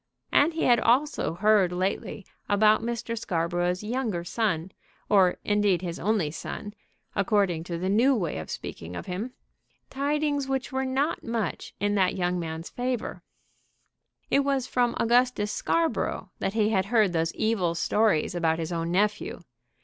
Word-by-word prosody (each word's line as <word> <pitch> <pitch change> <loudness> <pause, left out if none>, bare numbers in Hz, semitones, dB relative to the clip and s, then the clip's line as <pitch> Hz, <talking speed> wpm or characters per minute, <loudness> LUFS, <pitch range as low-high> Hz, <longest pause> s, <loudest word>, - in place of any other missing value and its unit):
And 320 +3 +4
he 325 - -1
had 240 -2 +5
also 245 - +1
heard 205 -1 +4
lately 190 +2 -2 0.2
about 215 +1 +4
Mr. 230 0 -3
Scarborough's 175 -2 -1
younger 220 -6 -2
son, 185 -3 -1 0.4
or, 190 -3 +4
indeed, 205 -4 +2
his 170 -1 -4
only 200 -7 +1
son, 205 +6 -6 0.4
according 195 -5 +1
to 170 -1 -4
the 180 +2 -2
new 235 +8 +4
way 170 - -2
of 80 - -8
speaking 85 +2 -7
of - - -6
him, 205 +8 -4 0.6
tidings 285 0 0
which 270 0 -2
were 265 0 -1
not 275 +5 -1
much 230 -2 -3
in 205 0 +1
that 190 -3 +2
young 180 -1 0
man's 160 0 -5
favor. 250 -1 -3 1.1
It - - +5
was 275 -2 +1
from 245 -2 +1
Augustus 240 -3 +2
Scarborough 330 -1 -1
that 195 - -1
he 215 -2 +3
had 195 -3 +1
heard 215 -5 +3
those 165 0 +1
evil 195 -7 0
stories 205 -2 +2
about 165 -2 +1
his 165 +1 -4
own 165 -1 -2
nephew. 210 - 0
210 Hz, 155 wpm, -27 LUFS, 175-240 Hz, 1.1 s, had